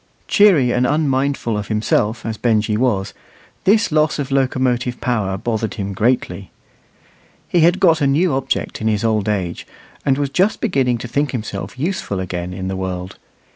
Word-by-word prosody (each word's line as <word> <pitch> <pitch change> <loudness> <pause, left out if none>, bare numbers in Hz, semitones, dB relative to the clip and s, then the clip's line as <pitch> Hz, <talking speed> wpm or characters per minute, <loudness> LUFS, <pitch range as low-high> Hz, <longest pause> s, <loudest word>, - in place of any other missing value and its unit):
Cheery 175 -12 +5
and 125 +1 +2
unmindful 140 -5 0
of 105 -1 -3
himself, 110 +1 0
as 110 -1 -2
Benjy 110 -2 +1
was, 105 -5 0 0.5
this 210 0 +3
loss 155 0 +2
of 140 -2 -4
locomotive 130 -2 0
power 105 -6 -1
bothered 110 +1 -2
him 100 -3 -4
greatly. 105 -2 -1 1.0
He 175 - +1
had 170 +3 +4
got 165 -4 +4
a 140 - +3
new 155 +4 +2
object 135 -3 -2
in 110 - 0
his 110 0 0
old 110 -2 +1
age, 95 -5 -3 0.4
and 135 -1 +2
was 140 -1 -1
just 190 +8 +2
beginning 135 - +1
to 120 - -7
think 140 +4 -1
himself 105 -4 -5
useful 145 - -2
again 90 -1 -4
in 95 +1 -5
the 95 - -2
world. 95 -1 -5
120 Hz, 170 wpm, -19 LUFS, 105-140 Hz, 1.0 s, Cheery